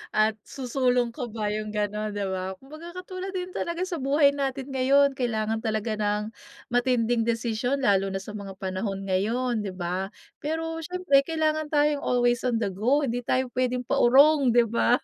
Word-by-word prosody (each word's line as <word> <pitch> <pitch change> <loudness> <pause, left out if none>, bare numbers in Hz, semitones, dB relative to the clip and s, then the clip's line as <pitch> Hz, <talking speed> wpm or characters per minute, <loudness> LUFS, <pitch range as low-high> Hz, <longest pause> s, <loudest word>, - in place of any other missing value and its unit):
At 215 0 +3
susulong 250 -2 0
ka 250 -2 -5
ba 210 -2 -3
'yong 215 0 -3
gano'n, 210 0 -2
di 205 - -2
ba. 190 0 -3
Kumbaga 310 +5 -11
katulad 370 +1 -6
din 365 0 -3
talaga 340 +1 -3
sa 345 -5 -4
buhay 280 +1 +4
natin 275 -1 -3
ngayon 275 +2 +4
kailangan 220 -3 -1
talaga 220 -1 -1
ng 210 0 0 0.5
matinding 245 -1 +2
desisyon 235 +3 -1
lalo 195 -3 +3
na 195 - -3
sa 205 - -8
mga 200 -2 -7
panahon 195 +1 -3
ngayon, 220 +5 0
di - - -2
ba? 180 +2 -3 0.3
Pero 325 +2 -3
siyempre 360 -4 +2
kailangan 310 -1 0
tayong 295 -1 +3
always 245 -1 +2
on 240 -2 +1
the 200 - 0
go, 250 +10 +2
hindi 245 -1 -2
tayo 255 0 0
puwedeng 250 0 0
paurong, 275 +3 +5
di 240 - +7
ba? 235 +2 +2
245 Hz, 170 wpm, -26 LUFS, 215-280 Hz, 0.5 s, di